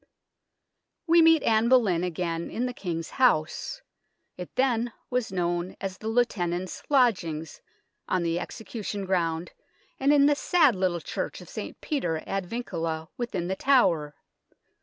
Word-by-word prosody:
We 335 0 +6
meet 325 -1 +6
Anne 225 +1 +3
Boleyn 205 -10 +4
again 170 -1 -2
in 240 - -2
the 250 - -3
King's 165 -6 -4
House 200 - +1 0.5
it 180 -1 -9
then 245 -2 +1 0.2
was 250 -4 -1
known 175 0 -1
as 190 -1 -5
the 220 - -6
Lieu 240 +2 +3
tenant's 180 -4 -3
Lodgings 185 - +1 0.5
on 185 -2 +1
the 170 0 0
execution 205 -1 -5
ground, 170 -2 -1 0.5
and 275 +2 +3
in 285 -1 +6
the 295 - +5
sad 300 - +3
little 180 -2 0
church - - -4
of - - -12
St. - - -7
Peter 175 - -2
ad 195 -2 -3
Vincula 165 -8 -4
within 200 -8 -3
The 190 - -1
Tower. 175 - +3
190 Hz, 145 wpm, -27 LUFS, 170-245 Hz, 0.5 s, We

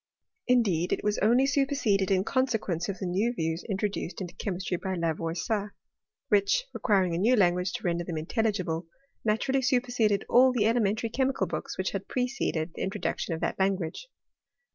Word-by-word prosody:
Indeed, 200 -9 +2
it - - -1
was 210 0 0
only 240 +5 +4
superseded 270 -8 +1
in 190 -1 +3
consequence 220 -9 -1
of 195 - -3
the 185 - -4
new 205 +7 0
views 165 -2 -2
introduced 200 -2 -2
into 180 -3 -6
che - - -4
mistry 185 0 -2
by 190 -1 -2
Lavoisier, 170 +5 -2 0.5
which, 205 - +3
requiring 190 -6 +2
a 165 - -1
new 235 +7 +4
language 180 -2 +2
to 245 -2 -5
render 175 -2 0
them 170 -2 -4
intelligible, 180 -2 -1 0.4
naturally 230 +5 +1
superseded 245 -5 +1
adl 255 +1 +5
the 210 -4 +2
elementary 225 0 +1
chemical 265 +3 0
books - - -5
which - - -1
had - - -4
preceded 250 - -2
the - - -7
introduction 190 -2 -2
of 160 - -8
that 170 - -2
language. 190 - -1
200 Hz, 165 wpm, -28 LUFS, 180-240 Hz, 0.5 s, adl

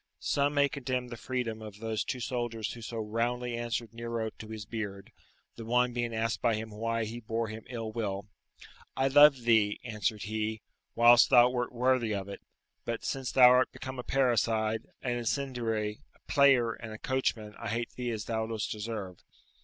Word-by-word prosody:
Some 145 +1 0
may 140 0 +5
condemn 130 -3 -3
the 120 - -6
freedom 120 -3 -3
of 105 -2 -9
those 110 0 -2
two 130 - -4
soldiers 115 -2 -3
who 120 - -10
so 115 +1 -6
roundly 120 +3 -1
answered 120 -1 -3
Nero 115 -1 -3
to 110 - -8
his 110 -2 -7
beard; 105 -3 -6 0.5
the 115 - -6
one 125 +2 +2
being 120 -1 -1
asked 115 +1 -1
by 115 -2 +2
him 110 0 -5
why 115 +1 -1
he 115 +2 -6
bore 115 0 -2
him 110 +1 -7
ill 115 -3 -4
will? 100 -3 -3 0.7
"I 135 +1 +2
loved 145 -2 +7
thee," 110 -3 +3
answered 110 -2 -2
he, 110 0 -3 0.3
"whilst 120 +1 +7
thou 125 -1 +7
wert 125 -1 -2
worthy 125 -3 +1
of 100 -1 -4
it, 100 - -8 0.4
but 115 -1 -4
since 135 -2 -2
thou 125 -2 +8
art 125 +1 +4
become 130 -1 -7
a - - -4
parricide, 115 -4 +1 0.2
an 120 -1 -1
incendiary, 115 -4 -2 0.2
a - - -26
player, 135 -5 +5
and 110 0 -9
a 110 - -7
coachman, 110 -4 -1
I - - -4
hate 115 +2 -2
thee 125 -1 -4
as 110 -3 -3
thou 110 -1 -2
dost 110 -2 -3
deserve." 105 -4 -5
115 Hz, 185 wpm, -30 LUFS, 110-125 Hz, 0.7 s, thou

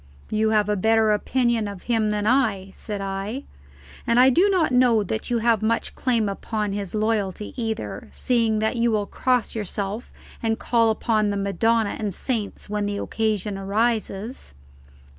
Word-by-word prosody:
"You 215 0 +2
have 210 -2 +2
a 210 - +1
better 220 +2 +3
opinion 235 +1 +1
of 200 -3 -8
him 225 -3 +1
than 210 0 -1
I," 215 -6 +1
said 205 -2 -6
I; 195 +7 -4 0.6
"and 235 +1 +4
I 260 +1 +7
do 365 +10 +4
not 355 -7 +2
know 250 -4 +4
that 220 +5 -4
you 240 - +1
have 230 -3 +3
much 225 +1 0
claim 235 -4 +1
upon 210 +1 -3
his 200 -1 -4
loyalty 210 -2 -1
either, 225 -3 -4
seeing 230 -4 +1
that 220 +3 0
you 235 0 +2
will 210 -2 +1
cross 250 +1 0
yourself 210 +1 -4 0.3
and 225 -1 0
call 230 -2 +2
upon 215 -1 +1
the 200 - -1
Madonna 215 +2 +1
and 205 -4 -2
saints 225 -6 -3
when 210 0 -1
the 205 0 -2
occasion 210 -2 -2
arises." 215 - -1
220 Hz, 165 wpm, -24 LUFS, 205-235 Hz, 0.6 s, I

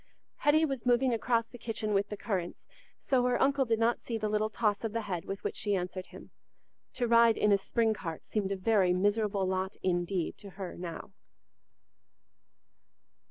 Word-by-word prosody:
Hetty 310 +2 +4
was 270 -5 -4
moving 245 +1 +3
across 230 0 +1
the 245 - -13
kitchen 220 -2 -3
with 200 +1 +1
the 210 - -5
currants, 185 -6 -3 0.3
so 260 -3 +1
her 250 -1 +2
uncle 275 0 +3
did 225 -2 +1
not 230 +1 +2
see 230 - -4
the 215 -1 -2
little 215 +1 +1
toss 210 -1 0
of 220 -2 -2
the 230 - -1
head 180 -5 -4
with 195 0 -6
which - - -3
she 205 -1 0
answered 185 0 -4
him. - - -13 0.6
To 245 - -1
ride 230 -1 +5
in 210 - +3
a 200 - +6
spring 225 +3 +1
cart 165 -6 -6
seemed 200 -3 -2
a - - 0
very 190 -2 +3
miserable 205 +1 +1
lot 190 +1 -2
indeed 175 -1 -1
to 200 - -10
her 190 -3 -5
now. 175 +2 -7
210 Hz, 185 wpm, -30 LUFS, 190-230 Hz, 0.6 s, a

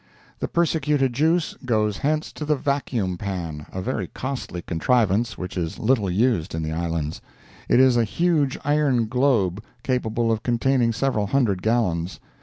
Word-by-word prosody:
The - - -2
persecuted 150 -6 +1
juice 160 +5 +1
goes 105 -4 +1
hence 155 +2 -1
to - - -6
the 150 0 +2
"vacuum 125 -10 -1
pan"—a 90 -2 -5
very 110 -6 -2
costly 130 -9 -5
contrivance 110 +4 +1
which 90 -1 -6
is 85 -3 -3
little 110 -4 +1
used 100 -4 +1
in 80 - -2
the 80 - -3
Islands. 80 -2 -2 0.5
It - - +5
is 130 -2 +5
a 120 - +4
huge 150 - +1
iron 145 -5 +2
globe, 110 -6 +1 0.2
capable 120 -3 0
of 110 -1 0
containing 120 0 +2
several 115 -3 0
hundred 105 -6 +1
gallons. 95 -7 0
115 Hz, 150 wpm, -23 LUFS, 95-135 Hz, 0.5 s, It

